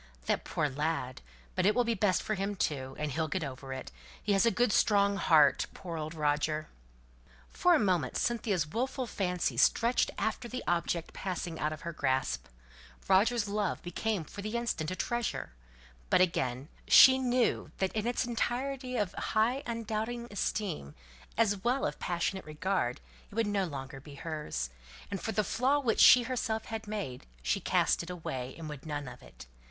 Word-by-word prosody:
"That - - 0
poor - - -1
poor 130 - -8
lad! 150 -4 -2 0.3
But 185 - +2
it 210 - +3
will 245 - +4
be 235 0 +1
best 200 -3 +1
for 215 - -1
him 200 0 -2
too. 135 -7 -2
And 150 -1 -2
he'll 160 +3 -1
get 175 +2 -2
over 135 -1 -6
it. 130 - -6 0.3
He 205 - +2
has 195 +4 +4
a - - +7
good 240 -1 +2
strong 200 -1 +3
heart. 150 -7 +4
Poor 170 -3 -6
old 155 0 -4
Roger!" 150 0 0 0.8
For 355 -1 +4
a - - +3
moment 180 - +1
Cynthia's 210 -8 0
wilful 255 - -2
fancy 180 -5 -1
stretched 235 +2 +3
after 220 +3 -2
the 250 +1 -5
object 170 -1 -1
passing 175 -3 -4
out 150 - 0
of 155 - -7
her 170 - -5
grasp, 130 - 0 0.6
Roger's 210 +3 +3
love 205 -2 -1
became 190 +2 -2
for 200 +6 -9
the 215 +3 -2
instant 225 -10 -2
a 185 - -3
treasure; 235 - -2 0.6
but, - - +5
again, 135 -6 +1 0.2
she 265 0 +9
knew 250 -2 +1
that 190 -1 0
in 220 +1 -1
its 245 +1 0
entirety 250 +2 -2
of 205 -4 0
high 235 +5 +1
undoubting 230 +1 -3
esteem, 190 - -2 0.4
as 210 -3 +3
well 255 +3 +1
as - - -1
of - - -24
passionate 180 +2 -2
regard, 155 -4 -1 0.3
it 205 - -13
would 230 0 +2
no 205 -2 0
longer 135 -4 -6
be 145 +1 -12
hers; 145 - -4 0.4
and 195 - -3
for 225 - -2
the 215 0 +1
flaw 255 +8 +2
which 245 -6 0
she 250 - +9
herself 225 -3 -2
had 220 -1 -5
made 200 - -5 0.2
she 65 0 +1
cast - - +2
it 170 - -8
away, 135 -7 -5
and 165 -2 -7
would 150 0 -8
none 145 -2 -3
of - - -10
it. - - -13
190 Hz, 185 wpm, -31 LUFS, 155-230 Hz, 0.8 s, she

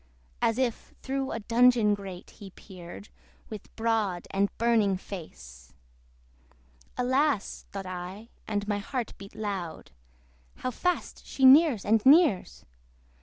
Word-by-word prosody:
As 225 - +2
if 255 -3 -2
through 270 0 -2
a 225 - -3
dungeon 235 -1 +4
grate 195 -3 -8
he 200 - -12
peered, 185 +1 -12 0.4
With 215 -3 -10
broad 220 -6 -1
and 200 +1 +1
burning 220 -5 +2
face. 65 - -11 1.2
Alas! 260 -1 0
(thought 195 -1 -6
I, 185 +5 -7 0.2
and 205 -1 -2
my 205 -1 -1
heart 240 +3 -4
beat 200 0 -12
loud) 195 - -5 0.6
How 255 - -4
fast 360 +8 -2
she 270 - +1
nears 275 - +6
and 220 +1 +3
nears! 265 - +4
210 Hz, 125 wpm, -28 LUFS, 195-250 Hz, 1.2 s, nears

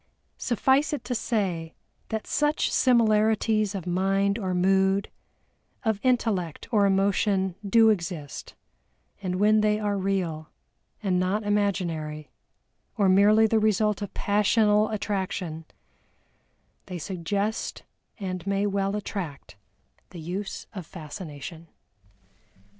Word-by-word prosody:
Suffice 265 +5 +2
it 295 - -3
to 250 - -3
say 185 -9 -2 0.3
that 220 -1 -3
such 295 0 +1
similarities 215 -3 +3
of 190 - -5
mind 195 +3 +1
or 185 -3 -2
mood, 190 +2 +2 0.7
of 220 -2 +1
intellect 220 - 0
or 205 -3 +4
emotion 195 -1 +1
do 220 +2 +5
exist, 170 -7 -5 0.7
and 185 -2 -2
when 210 +3 +4
they 210 0 +2
are 205 -2 -1
real, 180 -5 -2 0.5
and 185 -3 +1
not 190 +4 0
imaginary, 175 -7 -1 0.7
or 200 -3 +3
merely 205 +3 +6
the 220 0 +3
result 215 -1 +1
of 205 - -4
passional 210 +1 +3
attraction, 190 -6 -3 1.2
they 180 -2 -5
suggest 195 +5 -3 0.4
and 185 -2 -5
may 200 +1 +1
well 200 0 0
attract 185 - -5 0.5
the 175 - -10
use 185 +5 -5
of 190 -4 -6
Fascination. 160 -1 -8
200 Hz, 110 wpm, -26 LUFS, 180-215 Hz, 1.2 s, merely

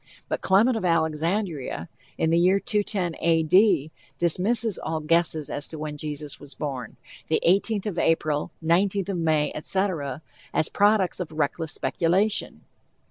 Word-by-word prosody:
But - - -3
Clement 215 +6 +3
of 220 - -3
Alexandria, 165 -1 -1 0.3
in 160 - +1
the 170 - +4
year 185 +3 +4
210 205 -6 -2
A. 165 -1 +3
D., 175 -3 +3 0.3
dismisses 205 +6 +1
all 160 0 -3
guesses 160 -1 +2
as 145 - -2
to 160 - -7
when 150 -1 -5
Jesus 150 -1 -6
was 145 -1 -12
born, 130 -6 -5 0.3
the - - +1
18th 200 +3 +2
of 200 -5 -3
April, 155 -2 +1 0.2
19th 190 +3 +1
of 195 - -2
May, 155 -2 +1
etc., 155 -5 -1 0.3
as 155 - +3
products 205 -3 +2
of 175 -4 -5
reckless 155 +1 -2
speculation. 190 +6 0
170 Hz, 145 wpm, -25 LUFS, 155-195 Hz, 0.3 s, the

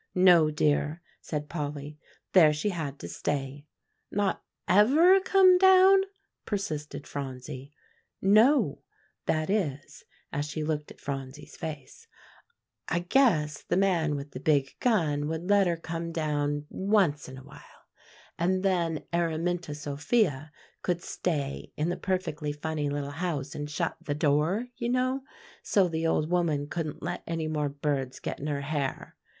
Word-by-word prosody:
"No, 175 -4 +6
dear," 150 +1 +1 0.2
said 150 -1 -4
Polly; 150 -1 -5 0.3
"there 165 -5 +7
she 150 +8 -1
had 155 -7 -4
to - - -8
stay." 145 0 -4 0.4
"Not 205 -1 -1 0.2
ever 285 - +6
come 375 -1 +5
down?" 380 +1 +7 0.4
persisted 150 -8 -4
Phronsie. 135 0 -7 0.5
"No; 215 - +4 0.5
that 155 0 +1
is," 150 -10 -2 0.3
as 145 +1 -1
she 155 +1 -4
looked 150 -1 -2
at - - -14
Phronsie's 135 +1 -6
face, 150 - -8 0.8
"I - - 0
guess 175 - +2
the 175 - -1
man 170 -6 +2
with 140 0 -6
the 130 - -7
big 140 -2 +1
gun 155 -11 +1
would 160 +2 -4
let 200 -2 +5
her 170 -1 0
come 165 +1 -5
down 145 -2 -1
once 190 -9 +1
in 130 - -9
a 130 - -11
while; - - -16 0.5
and 185 +2 +1
then 170 -5 0
Araminta 170 -1 -1
Sophia 145 - 0 0.3
could 175 -1 -1
stay 145 -6 -3
in 155 +3 0
the 175 - -1
perfectly 170 -6 -2
funny 150 0 -3
little 145 0 -3
house 150 -3 -3
and 145 0 -5
shut 150 - -2
the 145 - -3
door, 155 +9 +1
you 235 - -2
know, 255 +2 +1 0.4
so 195 -3 +3
the 165 -1 -1
old 155 -1 +1
woman 160 -5 +1
couldn't 155 -2 -4
let 175 +2 -3
any 165 -1 -2
more 150 -2 -1
birds 140 -2 -2
get - - -5
in 145 - -4
her 145 -1 -2
hair. 140 -2 -3
155 Hz, 145 wpm, -28 LUFS, 145-185 Hz, 0.8 s, there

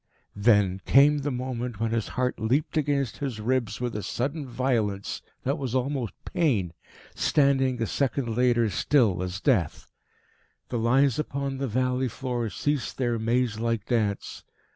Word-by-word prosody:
Then 100 -3 +3
came 145 +2 +6
the 145 +1 -2
moment 125 -3 -4
when 115 0 0
his 115 -2 -1
heart 125 -1 0
leaped 125 +10 0
against 140 -5 0
his 130 -6 -4
ribs 120 0 -1
with 120 -2 -3
a 105 - -2
sudden 135 - -3
violence 115 -6 -1 0.2
that 140 +4 -1
was 130 -3 -3
almost 130 -2 -1
pain, 120 - 0 0.4
standing 135 -3 +2
a 115 - +1
second 125 -1 -1
later 120 -1 +3
still 110 -11 +2
as 90 +1 -4
death. 110 - 0 0.8
The 120 - -1
lines 130 +3 +3
upon 140 -2 -3
the 135 - -1
valley 125 +2 0
floor 120 -1 -3
ceased 145 +4 -2
their 120 -3 0
maze 115 0 0
like 115 -2 -1
dance. 110 -5 -1
125 Hz, 150 wpm, -26 LUFS, 110-135 Hz, 0.8 s, came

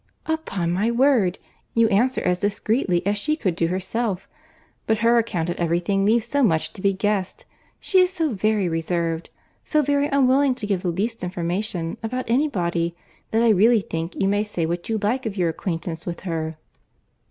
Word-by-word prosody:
"Upon 200 - -2
my 200 +6 +1
word! 235 -7 +3 0.4
you 230 -1 +5
answer 245 +6 +2
as 180 0 +1
discreetly 205 -2 0
as 205 +1 +1
she 305 +8 0
could 185 - -1
do 165 -1 +1
herself. 190 +2 -2 0.6
But 220 - +2
her 235 0 +5
account 185 -8 -1
of - - -5
every 170 0 +1
thing 195 +2 0
leaves 230 +1 +3
so 285 +5 0
much 160 -8 +1
to - - -10
be 200 - +3
guessed, 195 -1 -2 0.3
she 380 - +2
is 365 0 +4
so 325 -7 -1
very 210 -1 +1
reserved, 165 0 -2 0.3
so 305 -1 +1
very 285 +1 +1
unwilling 275 -1 +3
to 220 - -6
give 200 -3 0
the 185 - -3
least 205 +7 -2
information 175 0 -2
about 255 +3 -3
any 260 +7 +2
body, 170 - -1 0.3
that 225 +1 +2
I 235 - +5
really 220 +2 +5
think 165 -1 -5
you 195 - +2
may 205 +1 +2
say 205 -6 -2
what 175 +4 -3
you 225 - +1
like 225 +4 -1
of 210 -1 -5
your 175 -2 +2
acquaintance 165 0 -4
with 170 -1 -4
her." 160 -3 -3
200 Hz, 190 wpm, -23 LUFS, 175-235 Hz, 0.6 s, you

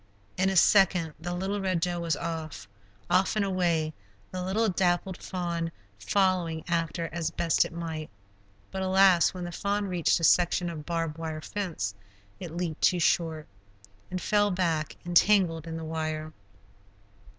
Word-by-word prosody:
In 190 +1 +2
a 195 - -1
second, 180 -4 +4
the 175 +2 -4
little 195 +3 -2
Red 185 -3 0
Doe 175 +1 -1
was 165 -3 0
off; 160 -5 -5 0.4
off 185 - +2
and 210 -2 +1
away, 170 -5 0 0.4
the 185 - -4
little 200 +5 +1
dappled 180 -1 0
fawn 170 -3 -3 0.3
following 165 - +1
after 165 -1 -1
as 165 0 -2
best 165 0 +2
it - - -7
might. 165 -2 -5 0.6
But 190 - -4
alas, 190 -2 +4
when 180 - -5
the 175 - -5
fawn 200 +3 -1
reached 180 -4 +1
a - - -6
section 175 +1 +3
of 155 -3 -8
barb 165 -2 -2
wire 160 -1 -4
fence, 160 - -3 0.5
it 175 - -6
leaped 170 -3 -3
too 180 - +4
short, 160 -2 +1 0.6
and 185 - -3
fell 205 +2 +2
back 170 -5 -1
entangled 175 -2 +3
in 165 0 -4
the 165 - -6
wire. 155 -1 -3
175 Hz, 155 wpm, -28 LUFS, 160-185 Hz, 0.6 s, second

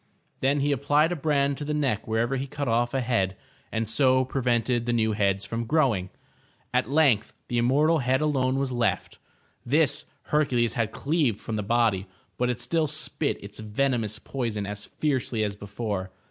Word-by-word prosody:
*^' - - -42 0.4
Then 140 +2 +2
he 145 +1 +1
applied 145 +4 +2
a - - 0
brand 140 -3 +1
to - - -4
the 150 +1 -2
neck 135 -8 0
wherever 115 +4 0
he 135 +1 -3
cut 140 +2 -4
off 120 +2 +1
a 135 - +1
head, 100 -6 0 0.3
and 110 0 -1
so 130 +3 +3
prevented 120 -2 0
the 120 - +1
new 110 -2 +2
heads 100 -2 +1
from 115 +1 -3
growing. 120 - +2 0.6
At 105 - +1
length 135 -8 +3 0.2
the 120 - +1
immortal 150 +7 +3
head 130 0 +2
alone 135 -4 +1
was 135 -1 -1
left. 120 -2 -1 0.4
This 150 +4 +2 0.2
Hercules 125 -6 +1
had 115 -3 -1
cleaved 140 -7 0
'from 110 - -5
the 105 - -1
body, 105 -3 +1 0.3
but 125 0 +2
it 125 0 -2
still 160 +4 0
spit 150 0 -1
its 100 +1 -8
venomous 110 0 0
poison 115 -5 -3
as 105 0 -5
fiercely 130 -6 -1
as 105 -1 -2
before. 100 -2 -4
120 Hz, 180 wpm, -26 LUFS, 110-140 Hz, 0.6 s, so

